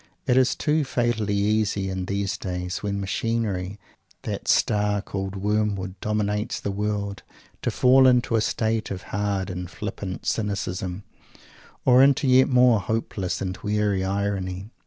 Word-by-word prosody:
It 125 - +3
is 130 -1 +4
too 150 0 +1
fatally 120 -5 0
easy, 100 -1 +1
in 95 -1 -3
these 100 0 -2
days, 90 -1 -4
when 100 -1 -2
machinery 100 -2 -2 0.5
that - - -5
"Star 105 -1 +2
called 95 -1 -5
Wormwood" 100 -2 -1
dominates 105 +1 -1
the 100 - -3
world, 100 -1 -2 0.4
to - - 0
fall 130 +1 +5
into 125 -2 +3
a 110 - +3
state 110 0 -1
of 95 0 -5
hard 100 -2 -1
and 90 -1 -5
flippant 95 -2 -6
cynicism, 95 -3 -2 0.8
or 125 0 +7
into 140 +1 +4
a 130 - +3
yet 130 +2 +6
more 125 -3 +5
hopeless 100 -2 -2
and 90 -1 -3
weary 105 -1 0
irony. 100 0 -2
105 Hz, 145 wpm, -24 LUFS, 95-110 Hz, 0.8 s, or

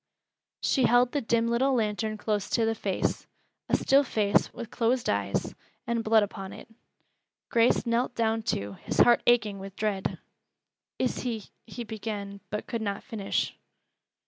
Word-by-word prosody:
She 265 -3 +3
held 245 +1 +4
the 290 - 0
dim 230 0 +1
little 260 +3 +2
lantern 215 -1 -1
close 210 -2 -1
to 230 - +2
the 225 - +1
face, 200 -3 -2 0.4
a - - +4
still 275 +1 +4
face 210 -5 +1
with 235 -1 -8
closed 240 +1 +1
eyes, 100 -1 -1 0.3
and 230 -1 -1
blood 220 -1 +5
upon 195 -1 -6
it. - - -11 0.8
Grace 230 +2 +3
knelt 240 +1 0
down 225 -1 +1
too, 100 - -3
his - - -3
heart 240 -1 +6
aching 220 -5 +3
with 195 0 -9
dread. 205 -3 -1 0.8
"Is 255 - 0
he 230 -5 -4
" - - -49
he 240 - -6
began, 210 -2 -5
but 210 - -3
could 230 - -3
not 200 -2 -3
finish. 215 -6 -2
225 Hz, 160 wpm, -28 LUFS, 205-235 Hz, 0.8 s, heart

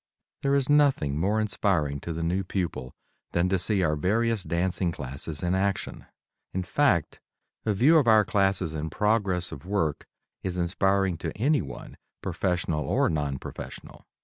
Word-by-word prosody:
There 140 0 +2
is 135 -2 +1
nothing 140 - +3
more 100 +6 +1
inspiring 90 -9 0
to 85 - -6
the 85 +1 -3
new 90 +4 0
pupil 85 -10 -3 0.4
than 85 +1 +2
to 95 -1 +1
see 95 +1 +1
our 75 -2 +2
various 110 +7 +1
dancing 90 0 -1
classes 70 +2 -6
in 90 +1 +1
action. 95 0 -2 0.5
In 95 - 0
fact, 90 - +1 0.5
a 105 - +3
view 150 +10 +6
of 135 - 0
our 110 -2 +6
classes 95 -5 +1
in 80 0 -3
progress 100 -3 0
of 70 - -8
work 90 -6 -1 0.3
is 90 -1 -3
inspiring 95 0 +1
to - - -5
anyone, 140 +7 -1 0.3
professional 90 -4 -1
or - - +2
non 75 -3 -1
professional. - - -9
95 Hz, 155 wpm, -27 LUFS, 80-105 Hz, 0.5 s, view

